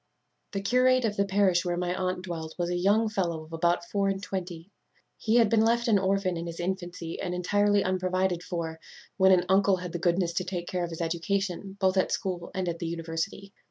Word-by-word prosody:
_ - - -49
"The 195 - -2
curate 255 +4 +3
of 210 -2 0
the 200 - +2
parish 190 -3 +3
where 175 -1 -1
my 180 0 -1
aunt 185 0 -2
dwelt 165 -3 -6
was 175 -1 -1
a - - 0
young 205 +5 +3
fellow 175 -6 -2
of 160 +1 -14
about 170 +1 +1
four 200 0 0
and 195 0 -1
twenty. 180 -2 -6 0.5
He 220 0 +1
had 235 -2 +6
been 220 +1 +3
left 235 +2 +2
an 210 -3 +4
orphan 190 -2 0
in 170 +1 -4
his 170 0 -7
infancy, 175 -2 -4
and 180 -1 -2
entirely 205 +3 +2
unprovided 185 -1 0
for, 165 -3 -4 0.4
when 190 -1 +6
an 180 -1 +4
uncle 195 +1 +4
had 180 -1 -6
the 175 - -4
goodness 175 0 +1
to 185 - -1
take 180 -1 -4
care 180 -1 -2
of 170 - -3
his 165 0 -6
education, 190 +3 -2
both 190 0 +2
at 190 - +2
school 180 -3 -2
and 185 -1 -1
at 170 -1 -3
the 170 - -3
university. 165 +4 -4
185 Hz, 225 wpm, -28 LUFS, 175-195 Hz, 0.5 s, had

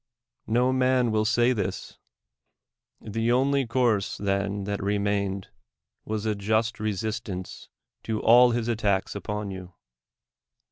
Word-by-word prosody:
No 125 +3 +2
man 130 -2 +2
will 110 0 +1
say 120 +2 +3
this! 105 -6 -4 1.0
The 115 +2 -1
only 135 +1 +2
course 115 -4 +1
then 100 0 -1
that 100 +1 -3
remained 100 -1 -1 0.6
was 110 0 -3
a 110 - +1
just 110 +3 0
resistance 105 -2 -4 0.3
to 110 -1 -3
all 120 +2 +6
his 120 -1 -1
attacks 105 -4 0
upon 105 0 -4
you. 95 -2 -9
110 Hz, 120 wpm, -26 LUFS, 100-120 Hz, 1.0 s, all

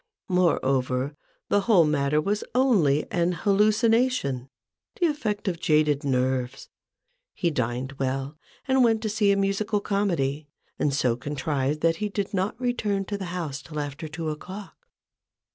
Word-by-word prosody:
Moreover, 135 -6 +1 0.3
the 205 - +3
whole 195 -6 +5
matter 150 0 +1
was 205 +7 -1
only 190 - +3
an 175 0 +1
hallucination— 210 - +2 0.5
the 355 - +3
effect 225 -11 -1
of 175 -3 -1
jaded 150 -2 +2
nerves. 130 -1 -1 0.7
He 170 - 0
dined 125 -1 -2
well, 135 +2 -2 0.3
and 265 -1 +4
went 225 -2 +2
to 215 - -1
see 210 -1 +2
a 200 - +2
musical 200 +2 0
comedy; 170 -9 -1 0.3
and 145 - +2
so 130 -4 +1
contrived, 145 +2 -2
that 165 0 +2
he 210 +2 -2
did 200 0 -3
not 195 +4 -1
return 215 -6 -1
to 205 +1 -3
the 190 - -4
house 165 -6 -4
till 150 0 -7
after 145 +2 -5
two 160 0 -4
o'clock. 185 +6 -8
170 Hz, 145 wpm, -26 LUFS, 140-205 Hz, 0.7 s, whole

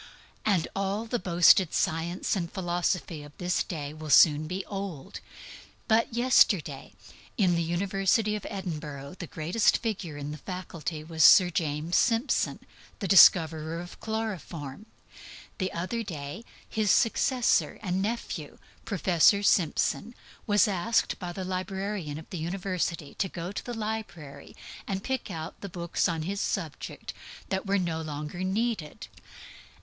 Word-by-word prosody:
And 195 -6 +2
all 195 +3 -1
the 235 +1 -2
boasted 175 -1 +5
science 165 +5 0
and 170 -3 -3
philosophy 175 -3 -1
of 145 0 -13
this 180 0 0
day 150 -5 -5
will 155 0 -8
soon 150 +1 +6
be 185 +3 -4
old. 195 -8 -6
In - - -12 0.7
my 230 +2 +1
time, 155 - +3 0.5
in 185 -5 +3
the 170 - +1
university 195 +5 +1
of 210 - -6
Edinburgh, 155 -5 -6
the 175 - -5
greatest 170 +9 +1
figure 195 -9 -4
in 145 0 -5
the 150 - -7
faculty 170 -3 -6
was 160 0 0
Sir 180 -2 +8
James 160 -1 -1
Simpson, 230 +3 +1 0.4
the 200 - -3
discoverer 165 -4 +6
of 175 0 -9
chloroform. 205 -7 -5 0.7
Recently 185 -2 -4 0.2
his 215 -2 0
successor 245 +3 +2
and 185 -1 -1
nephew, 230 +4 -4 0.3
Professor 195 0 +3
Simpson, 200 +5 +1 0.3
was 210 +1 +4
asked 205 +4 0
by 180 -2 -5
the 185 +1 -5
librarian 185 -3 -3
of 160 - -10
the 180 - -4
University 175 -3 -3
to 190 - 0
go 175 +2 -5
to - - -5
the 245 - -5
library 210 -10 -6 0.3
and 195 0 -3
pick 265 -4 -3
out 165 -1 -7
the 200 - -6
books 170 0 -1
on 165 -2 -2
his 195 +4 -3
subject 165 -7 -4
(midwifery) - - -15
that 190 +1 -2
were 200 +1 +2
no 170 -3 -1
longer 150 +3 -5
needed. 200 -4 -2
180 Hz, 140 wpm, -28 LUFS, 160-200 Hz, 0.7 s, Sir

